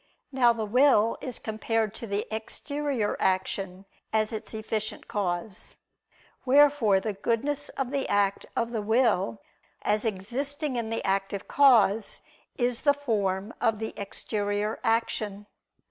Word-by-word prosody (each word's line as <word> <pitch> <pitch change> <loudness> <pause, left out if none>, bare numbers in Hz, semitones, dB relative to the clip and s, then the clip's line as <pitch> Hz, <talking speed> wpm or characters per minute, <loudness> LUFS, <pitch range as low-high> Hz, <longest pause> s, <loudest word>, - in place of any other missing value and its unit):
Now 250 -3 +5
the 225 -2 -2
will 230 -1 +4
is 255 -3 -5
compared 220 -1 -1
to 230 - -7
the 200 +1 -1
exterior 275 0 -2
action, 190 0 -1 0.3
as 215 0 +1
its 220 0 -6
efficient 220 0 -4
cause. 190 0 -3 0.7
Wherefore 275 -7 +5
the 210 +2 -3
goodness 270 +8 -1
of 265 -2 -2
the 280 -1 -1
act 200 -1 +1
of 235 0 -1
the 225 -3 -2
will, 220 -2 +1 0.4
as 210 0 +1
existing 255 +8 -2
in 230 -2 -2
the 225 - -2
active 195 +1 -1
cause, 225 -6 +4 0.4
is 245 -2 0
the 285 -1 +4
form 210 -6 -1
of 225 -3 +2
the 220 +1 -4
exterior 205 +1 -3
action. 215 -3 0
220 Hz, 130 wpm, -27 LUFS, 205-245 Hz, 0.7 s, Now